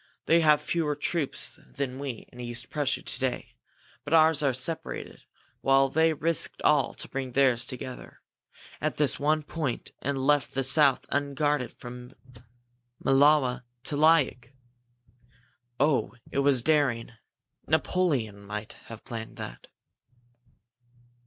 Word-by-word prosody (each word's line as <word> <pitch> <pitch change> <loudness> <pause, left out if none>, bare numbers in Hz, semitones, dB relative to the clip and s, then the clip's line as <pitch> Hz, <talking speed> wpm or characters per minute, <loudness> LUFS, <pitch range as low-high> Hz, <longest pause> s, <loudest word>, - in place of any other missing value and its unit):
They 165 - +5
have 150 -2 +4
fewer 155 -3 0
troops 150 0 -2
than 135 -2 -5
we 135 -5 -6
in 125 - -13
East 120 0 -5
Prussia 145 -3 -1
to - - -2
day, 130 -1 -3 0.5
but 155 - +1
ours 160 -2 +5
are 140 -2 +3
separated, 160 +6 -4 0.4
while 135 0 +4
they 160 +3 +3
risked 160 +2 0
all 145 -4 +3
to - - -5
bring 135 -1 -4
all 125 - -12
theirs 125 -3 +3
together 130 0 -8 0.6
at - - -1
this 150 -2 +2
one 155 +1 +1
point 150 -5 -4
and 135 -1 -2
left 145 -2 +2
the 135 - +1
south 135 0 +3
unguarded 140 -2 0
from 125 +1 -10 0.9
Mlawa 135 -2 +4 0.2
to 145 - -2
Liok! 145 -5 +3 1.3
Oh, 135 -6 +1 0.2
it - - -1
was 140 -3 +3
daring 140 -7 +1 0.6
Napoleon 145 - 0
might 105 +1 -6 0.2
have 115 -1 -10
planned 115 -3 -7
that!" - - -8
140 Hz, 130 wpm, -27 LUFS, 125-150 Hz, 1.3 s, They